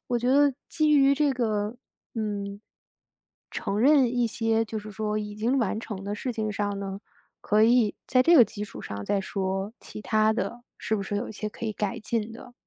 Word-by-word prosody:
我 240 -1 +1
觉 245 +2 -1
得 285 +1 +5 0.2
基 310 -1 +2
于 275 -1 +5
这 290 0 +2
个， 215 -3 -1 0.4
嗯， 205 -2 -3 0.9
承 200 - -2
认 265 -1 +5
一 245 -1 +2
些 225 0 +1
就 220 0 -6
是 210 +1 -9
说 210 0 -2
已 210 0 -5
经 235 +5 +1
完 220 -3 0
成 210 -4 -6
的 205 +1 -4
事 250 +3 -3
情 220 -2 -2
上 205 0 -2
呢， 195 0 -5 0.4
可 210 +1 +3
以 230 -2 +4
在 255 -1 +4
这 340 - +6
个 245 - +9
基 210 -1 -6
础 210 - -10
上 100 0 -6
再 200 - +1
说， 195 +1 -3
其 215 - -10
他 215 0 +3
的 235 +2 -3 0.2
是 220 - -1
不 200 - -3
是 205 - -4
有 210 - -3
一 - - -7
些 215 0 -4
可 215 - -8
以 220 - -1
改 210 +2 -3
进 225 0 -2
的。 245 +2 -12
220 Hz, 225 characters per minute, -26 LUFS, 205-245 Hz, 0.9 s, 个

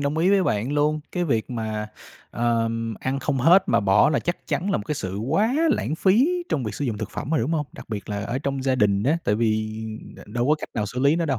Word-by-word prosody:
đồng 140 +2 -1
ý 180 +4 +3
với 200 -1 +4
bạn 115 - 0
luôn, 150 +1 +1
cái 180 -1 0
việc 115 -8 -1
mà, 110 -2 -3 0.4
ờ, 115 -1 +1 0.3
ăn 130 +1 -1
không 135 0 -1
hết 170 +9 +6
mà - - +3
bỏ 100 +6 +4
là 150 - +2
chắc 175 - -4
chắn 195 +4 -1
là - - +2
một - - -4
cái 150 - -1
sự 95 -8 -4
quá 160 - +1 0.2
lãng 155 - 0
phí 255 - +3
trong 135 - -1
việc 105 -2 -4
sử 145 - -3
dụng 115 -6 -2
thực - - -5
phẩm 140 - -5
rồi, 160 - +2
đúng 135 +8 -1
hông? 150 -3 0
Đặc - - -12
biệt 105 -3 -5
là 100 -1 -3
ở 120 +5 -2
trong 135 -1 -3
gia 130 -1 +2
đình 100 -4 +2
á, 155 +7 +2
tại 105 - +2
vì 110 -1 0 0.4
đ - - -15
đâu 120 +4 -1
có 150 - +5
cách 150 - -7
nào 105 -2 -1
xử 125 +5 -6
lý 140 +4 +4
nó 170 - 0
đâu. 135 -5 0
135 Hz, 275 wpm, -24 LUFS, 110-155 Hz, 0.4 s, hết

